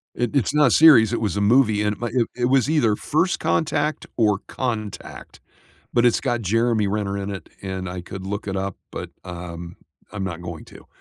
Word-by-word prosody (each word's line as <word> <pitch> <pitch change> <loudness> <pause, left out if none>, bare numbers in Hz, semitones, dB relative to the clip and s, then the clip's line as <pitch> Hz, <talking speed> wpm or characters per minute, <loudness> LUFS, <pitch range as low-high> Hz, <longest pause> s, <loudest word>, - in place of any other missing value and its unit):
It 120 +3 -2
It's 135 +1 +1
not 150 -2 +5
a - - +2
series, 125 -8 +7
it 115 - -1
was 100 -3 -1
a - - 0
movie, 110 -1 +4
and 105 0 0
my 120 - -2
it 120 -3 +2
it 120 -1 0
was 135 +2 +3
either 120 -10 +3
First 165 - 0
Contact 155 -1 0
or 105 -3 +3
Contact, 110 -6 -5 0.5
but 120 0 +3
it's 120 - +3
got 120 -1 -1
Jeremy 115 +1 +1
Renner 100 -1 -2
in 100 +1 -4
it, 95 - -7
and 95 -1 -4
I 90 0 -5
could 95 +2 -8
look 105 +1 -4
it 95 - -2
up, 95 0 -3
but, - - -6
um, 85 -1 -8 0.4
I'm 100 -2 -4
not 85 -2 -5
going 85 -3 -7
to. - - -15
105 Hz, 205 wpm, -22 LUFS, 95-120 Hz, 0.5 s, series